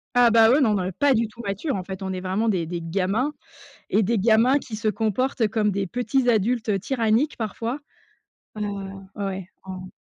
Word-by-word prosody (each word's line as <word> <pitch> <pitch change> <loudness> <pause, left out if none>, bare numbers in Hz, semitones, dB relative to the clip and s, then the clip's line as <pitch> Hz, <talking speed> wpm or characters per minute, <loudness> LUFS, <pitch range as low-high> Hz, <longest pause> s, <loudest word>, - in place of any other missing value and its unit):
Ah 245 -1 +6
bah 225 0 +6
oui, 285 - +4
non, 220 -6 +3
on 185 - -1
est 185 - -2
pas 275 +7 +3
du 225 0 +1
tout 220 +3 -11
matures 205 - -2
en 190 - -3
fait, 190 +1 -7
on 190 - -3
est 185 - -4
vraiment 190 +5 -1
des 180 -7 0
des 170 0 -4
gamins 195 - 0 0.6
et 215 - +3
des 225 +3 +1
gamins 230 +6 +4
qui 235 - -9
se 215 +1 -1
comportent 225 +3 0
comme 210 0 +1
des 195 0 -1
petits 245 +4 0
adultes 220 -2 +1
tyranniques 230 +5 +1
parfois. 230 +4 -3 0.8
Heu, 210 - -2 0.5
ouais 205 - -3
ouais, 190 -2 -4
en 185 -1 -8
220 Hz, 205 wpm, -24 LUFS, 190-235 Hz, 0.8 s, Ah